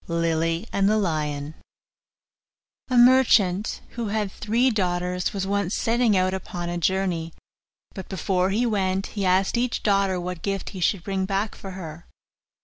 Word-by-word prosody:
LILY 165 +1 0
AND 195 0 +3
THE 215 - +3
LION 150 -6 -2 1.4
A 250 - +1
merchant, 235 -6 +4
who 235 -2 -4
had 205 -1 -1
three 235 +6 +1
daughters, 180 -3 -1
was 195 -1 -3
once 200 -1 -1
setting 230 -3 +2
out 185 0 +1
upon 175 -2 -5
a 175 0 -3
journey; 175 -2 -1 0.6
but 190 - -8
before 185 0 0
he 220 +5 +1
went 195 -3 0
he 200 -2 -2
asked 190 +5 +2
each 245 0 -1
daughter 195 -3 +2
what 180 -1 -5
gift 195 -1 -3
he 190 - -8
should 180 0 +1
bring 190 0 -1
back 200 +2 -1
for 195 -1 -9
her. 165 -2 -9
190 Hz, 155 wpm, -24 LUFS, 175-205 Hz, 1.4 s, merchant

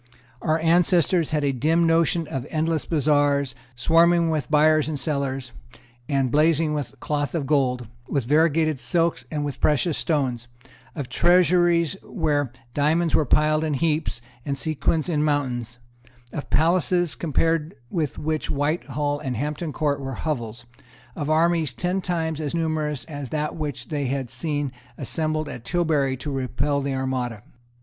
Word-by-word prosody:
Our 155 +1 +2
ancestors 170 0 +3
had 150 -2 0
a 140 - +2
dim 160 +6 +2
notion 165 0 +2
of 135 0 -4
endless 160 -1 0
bazaars, 145 -3 +2 0.2
swarming 165 +4 +4
with 150 -5 -2
buyers 155 0 +4
and 150 -3 -3
sellers, 135 -3 -2 0.6
and 135 -3 +1
blazing 155 +1 +3
with 140 -3 -4
cloth 145 +3 -2
of 155 -4 -1
gold, 130 -4 +1 0.2
with 140 -5 -1
variegated 155 +1 +2
silks 165 +7 0
and 150 -2 -2
with 140 -3 -5
precious 150 +2 +2
stones; 130 -7 -1 0.5
of 140 -5 -4
treasuries 175 +2 +3
where 145 - -1 0.2
diamonds 160 +4 +2
were 150 - +3
piled 155 +2 +3
in 155 -2 0
heaps 155 -3 0 0.2
and 140 -2 -2
sequins 155 +2 0
in 155 -4 +1
mountains; 125 -6 -1 0.6
of 145 - -5
palaces, 175 +2 +2
compared 165 0 0 0.2
with 155 -5 -2
which 155 0 -2
Whitehall 145 0 -1
and 130 -5 -3
Hampton 150 +4 -3
Court 145 -1 0
were 135 -1 -4
hovels; 120 -5 -4 0.5
of 145 -1 -3
armies 160 -3 +2
ten 180 +10 -1
times 160 -3 -2
as 150 +1 -2
numerous 155 -4 -1
as 145 -4 -7
that 150 +2 -2
which 150 -5 -5
they 145 -4 -1
had 130 -1 -3
seen 145 +1 -2 0.3
assembled 155 -1 -1
at 120 - -7
Tilbury 150 -3 +1
to 145 +3 -5
repel 135 +2 -1
the 140 -1 -2
Armada. 125 -5 -2
150 Hz, 150 wpm, -24 LUFS, 140-160 Hz, 0.6 s, swarming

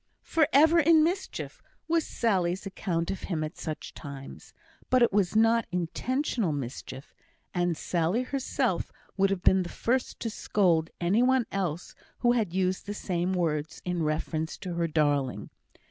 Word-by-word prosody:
"For 315 -3 +2
ever 320 +4 +6
in 320 0 +6
mischief," 360 +4 -3 0.3
was 330 -1 +1
Sally's 190 -5 0
account 175 -3 -2
of 195 - -5
him 160 -4 -1
at 155 +3 -5
such 155 -2 -6
times; 140 -2 -9 0.4
but 255 -1 +5
it 235 - +3
was 200 -2 +2
not 225 +1 +4
intentional 210 - -1
mischief; 130 -1 -6 0.4
and 175 -2 0
Sally 175 +8 0
herself 270 0 -1 0.2
would 195 0 +3
have 195 -2 -2
been 190 0 +5
the 175 - -4
first 255 +2 -1
to 225 - -2
scold 170 -7 +1
any 185 +7 +2
one 255 -1 +3
else 180 -4 -3 0.3
who 240 - +4
had 225 -7 +1
used 185 +1 -1
the 205 - -4
same 180 -2 -1
words 160 -4 -1
in 180 -1 -1
reference 155 +1 -2
to 180 -2 -5
her 170 0 0
darling. 145 -4 0
185 Hz, 160 wpm, -28 LUFS, 165-235 Hz, 0.4 s, ever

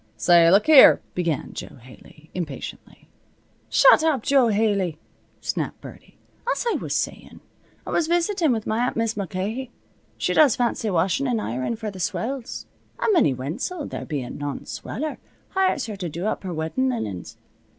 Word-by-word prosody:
"Say, 170 -1 +5
look 200 +4 +5
here 305 -4 +8
" - - -38
began 170 -5 -2
Jo - - -8
Haley, 130 +5 -17
impatiently. 160 -7 -7 0.6
"Shut - - +6
up, 300 -8 +1
Jo 270 -3 +4
Haley!" 200 -6 +1 0.4
snapped - - -3
Birdie. - - -13 0.3
"As - - -2
I - - 0
was - - -3
sayin', - - -4 0.5
I - - -5
was 330 - +1
visitin' 345 -1 +1
with 220 -3 -1
my 220 - -1
aunt 250 - -1
Mis' 230 -1 0
Mulcahy. 205 +6 -4 0.5
She - - 0
does 295 -6 +5
fancy 235 -2 -1
washin' 190 +9 +1
an' 240 -3 0
ironin' 130 - -2
for 220 -1 -5
the 190 - -10
swells. 240 +8 -3 0.3
An' 445 - +2
Minnie 305 - +3
Wenzel, 215 - -4
there - - -6
bein' 140 -5 -5
none 145 -1 -5
sweller, 305 +2 -5 0.3
hires 375 -7 +1
her 215 -3 -6
to 180 -3 -4
do 170 +5 -5
up 215 - -1
her 185 - -5
weddin' 165 +12 -1
linens. 110 - -5
215 Hz, 170 wpm, -23 LUFS, 165-265 Hz, 0.6 s, here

